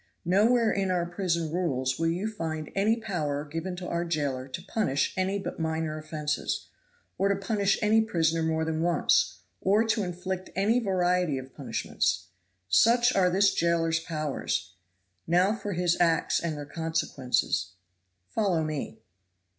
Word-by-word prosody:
Nowhere 220 Hz, +6 st, +4 dB
in 195 Hz, -1 st, 0 dB
our 180 Hz, -2 st, +1 dB
prison 170 Hz, -3 st, -1 dB
rules 130 Hz, -7 st, 0 dB
will 165 Hz, -, +1 dB
you 180 Hz, +6 st, -1 dB
find 160 Hz, -7 st, -4 dB
any 210 Hz, +3 st, +3 dB
power 155 Hz, -10 st, -2 dB
given 165 Hz, +5 st, -4 dB
to 180 Hz, 0 st, -6 dB
our 170 Hz, 0 st, -1 dB
jailer 145 Hz, -6 st, -2 dB
to 135 Hz, +6 st, -6 dB
punish 185 Hz, -9 st, 0 dB
any 190 Hz, +1 st, 0 dB
but 195 Hz, -, -5 dB
minor 160 Hz, -1 st, -1 dB
offenses, 150 Hz, -1 st, -3 dB, 0.5 s
or 195 Hz, +1 st, +3 dB
to 200 Hz, -, +3 dB
punish 200 Hz, 0 st, +1 dB
any 220 Hz, +1 st, +5 dB
prisoner 165 Hz, -6 st, +1 dB
more 160 Hz, 0 st, 0 dB
than 160 Hz, 0 st, -1 dB
once, 170 Hz, -2 st, +2 dB, 0.2 s
or 205 Hz, +4 st, +3 dB
to 225 Hz, -1 st, +1 dB
inflict 185 Hz, 0 st, -4 dB
any 215 Hz, +5 st, +3 dB
variety 180 Hz, -, +1 dB
of 130 Hz, 0 st, -8 dB
punishments. 85 Hz, +1 st, -2 dB, 0.4 s
Such 235 Hz, -, +4 dB
are 185 Hz, -2 st, +4 dB
this 195 Hz, +2 st, +3 dB
jailer's 165 Hz, -1 st, +1 dB
powers 155 Hz, -4 st, -3 dB, 0.5 s
now 180 Hz, +5 st, +3 dB
for 205 Hz, -3 st, -4 dB
his 175 Hz, -1 st, +2 dB
acts 165 Hz, -2 st, +3 dB
and 160 Hz, -3 st, -3 dB
their 145 Hz, -, -6 dB
consequences 135 Hz, -, -1 dB, 0.5 s
follow 190 Hz, -7 st, +1 dB
me." 155 Hz, -7 st, -4 dB
170 Hz, 150 wpm, -28 LUFS, 155-195 Hz, 0.5 s, any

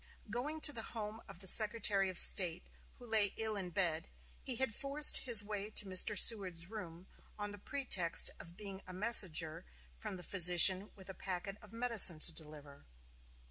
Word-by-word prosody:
Going 285 Hz, +7 st, -8 dB
to 295 Hz, -, +1 dB
the 230 Hz, -, -7 dB
home 220 Hz, 0 st, -10 dB
of -, -, -16 dB
the 190 Hz, -, -6 dB
Secretary 205 Hz, -2 st, +2 dB
of 185 Hz, -, -12 dB
State, 180 Hz, -2 st, +5 dB, 0.3 s
who 245 Hz, -, -19 dB
lay 215 Hz, -3 st, -4 dB
ill 220 Hz, -1 st, -6 dB
in 190 Hz, -3 st, -9 dB
bed, 170 Hz, -3 st, -6 dB, 0.3 s
he 255 Hz, -, -5 dB
had 250 Hz, -2 st, -4 dB
forced 280 Hz, +5 st, +1 dB
his 230 Hz, -5 st, +2 dB
way 205 Hz, 0 st, -10 dB
to 210 Hz, -, -1 dB
Mr. 190 Hz, +2 st, +2 dB
Seward's 185 Hz, -5 st, 0 dB
room, 180 Hz, -5 st, -13 dB, 0.3 s
on 205 Hz, 0 st, -9 dB
the 205 Hz, -, -15 dB
pretext 190 Hz, -10 st, -2 dB
of 170 Hz, +1 st, -16 dB
being 195 Hz, -2 st, -13 dB
a 185 Hz, -, -14 dB
messenger 180 Hz, -6 st, +2 dB, 0.4 s
from 185 Hz, -, -11 dB
the 180 Hz, -, -13 dB
physician 185 Hz, +2 st, +4 dB
with 190 Hz, -2 st, -18 dB
a 190 Hz, -, -10 dB
packet 190 Hz, +2 st, -10 dB
of 210 Hz, -, -18 dB
medicine 230 Hz, -7 st, +3 dB
to 165 Hz, +2 st, -5 dB
deliver. 150 Hz, -3 st, -14 dB
200 Hz, 180 wpm, -31 LUFS, 180-220 Hz, 0.4 s, State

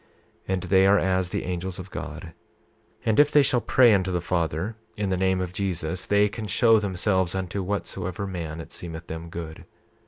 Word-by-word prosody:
28:30 95 Hz, -, 0 dB
And 95 Hz, -1 st, -1 dB
they 95 Hz, +1 st, +4 dB
are 100 Hz, +1 st, +6 dB
as 95 Hz, -2 st, +1 dB
the -, -, -2 dB
angels 90 Hz, 0 st, -4 dB
of 95 Hz, +1 st, -9 dB
God, -, -, -7 dB, 0.7 s
and 110 Hz, +2 st, +2 dB
if 145 Hz, 0 st, +6 dB
they 145 Hz, -1 st, +5 dB
shall 130 Hz, -3 st, +2 dB
pray 120 Hz, -2 st, +5 dB
unto 95 Hz, -2 st, +1 dB
the 90 Hz, -, 0 dB
Father 85 Hz, +3 st, -1 dB, 0.2 s
in 100 Hz, -2 st, -1 dB
the -, -, +2 dB
name 95 Hz, 0 st, +1 dB
of 90 Hz, -1 st, -3 dB
Jesus 90 Hz, -2 st, -2 dB
they 105 Hz, 0 st, +4 dB
can 105 Hz, +1 st, -6 dB
show 115 Hz, +3 st, +4 dB
themselves 95 Hz, -2 st, 0 dB
unto 95 Hz, +1 st, -3 dB
whatsoever 95 Hz, -1 st, -3 dB
man 85 Hz, -4 st, -5 dB
it 80 Hz, -, -9 dB
seemeth 85 Hz, -1 st, -7 dB
them 80 Hz, +1 st, -7 dB
good. 80 Hz, -2 st, -7 dB
95 Hz, 195 wpm, -25 LUFS, 85-100 Hz, 0.7 s, are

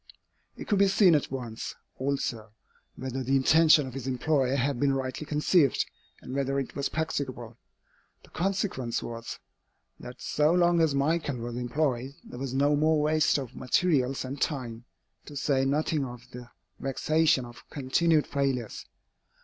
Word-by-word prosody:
It -, -, -8 dB
could 205 Hz, -, +2 dB
be 200 Hz, -, +6 dB
seen 190 Hz, -2 st, +5 dB
at 150 Hz, -, +1 dB
once, 120 Hz, -4 st, -5 dB, 0.2 s
also, 130 Hz, -5 st, -3 dB, 0.4 s
whether 130 Hz, 0 st, -4 dB
the 135 Hz, +2 st, +1 dB
intention 155 Hz, +2 st, +5 dB
of 130 Hz, -, -8 dB
his 135 Hz, -1 st, -6 dB
employer 130 Hz, 0 st, +1 dB
had 135 Hz, -1 st, 0 dB
been 140 Hz, 0 st, +2 dB
rightly 135 Hz, +3 st, -4 dB
conceived, 150 Hz, -1 st, +3 dB, 0.4 s
and -, -, -7 dB
whether 135 Hz, 0 st, 0 dB
it 135 Hz, -, -5 dB
was 140 Hz, -1 st, -1 dB
practicable. 130 Hz, -7 st, -4 dB, 0.6 s
The -, -, -19 dB
consequence 180 Hz, -, -1 dB
was, 115 Hz, 0 st, -6 dB, 0.6 s
that 125 Hz, +1 st, -10 dB
so 150 Hz, +2 st, +2 dB
long 175 Hz, -1 st, +4 dB
as 155 Hz, -4 st, +2 dB
Michael 145 Hz, -1 st, 0 dB
was 120 Hz, 0 st, -5 dB
employed, 130 Hz, +1 st, -1 dB
there 125 Hz, -, -10 dB
was 135 Hz, -1 st, -4 dB
no 145 Hz, +2 st, +3 dB
more 155 Hz, +1 st, +3 dB
waste 155 Hz, +1 st, +3 dB
of 135 Hz, -5 st, -6 dB
materials 135 Hz, -2 st, +1 dB
and 135 Hz, +2 st, -6 dB
time, 120 Hz, -5 st, -3 dB, 0.4 s
to 145 Hz, -, -9 dB
say 135 Hz, -1 st, +1 dB
nothing 150 Hz, +1 st, 0 dB
of 125 Hz, -2 st, -7 dB
the 125 Hz, 0 st, -10 dB, 0.3 s
vexation 155 Hz, 0 st, +1 dB
of 120 Hz, -1 st, -13 dB
continued 150 Hz, +3 st, +2 dB
failures. 135 Hz, -5 st, -2 dB
135 Hz, 155 wpm, -28 LUFS, 125-155 Hz, 0.6 s, be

